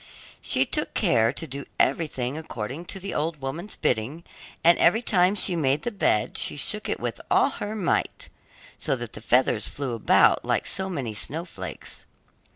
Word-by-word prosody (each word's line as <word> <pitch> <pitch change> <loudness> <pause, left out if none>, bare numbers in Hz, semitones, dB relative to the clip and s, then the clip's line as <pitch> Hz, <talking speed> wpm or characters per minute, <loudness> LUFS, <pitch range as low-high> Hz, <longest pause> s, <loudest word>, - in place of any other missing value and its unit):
She - - +2
took - - -2
care 115 0 +3
to 155 +4 -4
do 140 -1 -5
everything 135 -3 0
according 145 0 -6
to 195 - -6
the 195 +1 -5
old 155 0 -2
woman's 155 +9 -5
bidding 125 +8 -1 0.4
and 170 +1 +6
every 220 +8 +4
time 185 -2 +3
she 190 -3 +3
made 145 -3 +1
the 240 - -2
bed 200 - +1
she - - +3
shook - - 0
it - - -1
with - - -4
all - - +4
her 210 +1 -5
might, 190 -6 -1 0.5
so 135 - 0
that 120 -3 -7
the - - -9
feathers 125 -3 +2
flew 135 -4 -4
about 115 - +4
like - - 0
so 190 0 -2
many 130 -11 -4
snowflakes. 160 - -6
150 Hz, 170 wpm, -25 LUFS, 130-180 Hz, 0.5 s, and